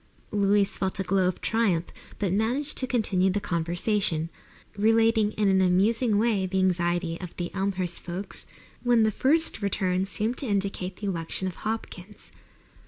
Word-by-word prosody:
Louise 200 -1 +2
felt 190 +1 -1
a - - +1
glow 190 0 +2
of 180 - -2
triumph, 200 -7 +1 0.3
but 195 -4 -1
managed 245 +8 0
to 260 - -1
continue 200 -7 +2
the 195 +2 0
conversation, 170 -1 -1 0.4
relating 225 0 +3
in 210 -1 +1
an 190 -1 +4
amusing 205 +5 +3
way 210 -4 +2
the 190 +1 -2
anxiety 175 -2 +1
of 180 -2 -8
the 175 -1 -4
Elmhurst 190 -3 -2
folks 185 +3 -6 0.3
when 240 -2 +4
the 220 - +3
first 295 +3 +1
returns 190 -1 0
seemed 220 +5 -2
to 270 - -3
indicate 195 -2 -1
the 205 - -7
election 180 0 -2
of 180 - -6
Hopkins. 210 -2 -6
195 Hz, 160 wpm, -26 LUFS, 180-220 Hz, 0.4 s, an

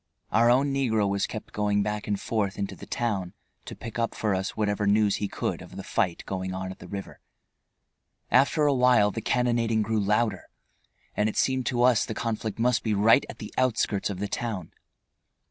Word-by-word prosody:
Our 115 +2 +4
own 135 +3 +3
negro 110 -7 +1
was 100 0 0
kept 110 - -8
going 105 -1 +1
back 105 0 -3
and 100 -1 -1
forth 100 -4 -1
into 100 -1 -3
the - - -11
town 100 -6 -2 0.3
to - - -7
pick 115 -1 -7
up 115 - -1
for 105 -2 0
us 95 +1 -3
whatever 105 -1 0
news 105 0 +3
he 105 - -2
could - - -3
of - - -12
the - - -6
fight 85 -2 -1
going 95 -1 -4
on 95 0 -4
at - - -11
the - - -11
river. 100 +2 -7 1.1
After 140 +4 +4
awhile 125 -6 +4
the 115 - -4
cannonading 115 -2 +1
grew 110 +1 0
louder, 105 0 +1 0.7
and 105 +1 +2
it - - -6
seemed 130 -1 +1
to 120 -1 +1
us 125 -3 +5
the 110 - -5
conflict 110 -1 -3
must 120 0 +2
be 110 -2 0
right 110 +6 +5
at - - -8
the 105 - -9
outskirts 110 -6 +1
of 100 - -4
the 100 +2 -2
town. 105 -7 -4
110 Hz, 195 wpm, -27 LUFS, 100-120 Hz, 1.1 s, us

